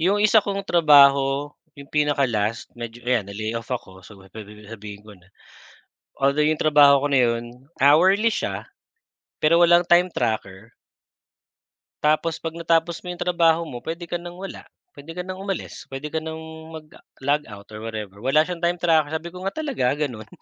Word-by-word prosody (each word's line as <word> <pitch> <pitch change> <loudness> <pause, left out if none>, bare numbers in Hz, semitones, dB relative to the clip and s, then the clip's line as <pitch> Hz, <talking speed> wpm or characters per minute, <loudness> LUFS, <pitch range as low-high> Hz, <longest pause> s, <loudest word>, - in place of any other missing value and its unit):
Yung 190 +5 +2
1 215 +1 +6
kong 200 -1 -4
trabaho, 140 -4 +4 0.2
yung 140 - -10
pinaka-last 130 -7 0
medyo 120 0 -9
ayan 120 -5 0
na-layoff 110 +3 -5
ako 95 -7 -6
so, 100 +2 -15 0.2
pe 110 - -8
pe 105 0 -13
sabihin 105 -1 -10
ko 105 - -13
na. 90 -2 -21 0.9
Although 140 +3 +2
yung 155 - +1
trabaho 145 -2 +6
ko - - +2
na 130 - +4
'yon 115 -1 +1 0.3
hourly 190 +10 +4
siya - - -3 0.8
pero 160 +2 +4
walang 175 0 +4
time 175 +1 +6
tracker. 110 -2 -3 1.3
Tapos 155 +2 +1
'pag 165 -1 -6
natapos 165 0 0
mo 180 - -10
yung 175 - -7
trabaho 170 -2 +2
mo 130 -7 -7
puwede 165 +4 -6
ka 170 0 -4
nang 175 0 -9
wala, 195 +1 -8 0.3
puwede 145 +3 -11
ka 180 - -3
ng 185 0 -7
umalis, 195 -6 -6
puwede 135 +2 -6
ka 160 - -1
nang 160 0 -6 0.3
mag 155 -1 -9 0.3
logout 135 -8 -2
or 105 - -8
whatever. 105 -3 -6
Wala 135 +6 +3
siyang 175 0 -6
time 175 +1 +1
tracker. 160 -3 +2
Sabi 160 +2 -4
ko 180 - -10
nga, 195 - -2
talaga 280 - -2 0.2
gano'n? 110 -6 -7
150 Hz, 175 wpm, -23 LUFS, 115-170 Hz, 1.3 s, 1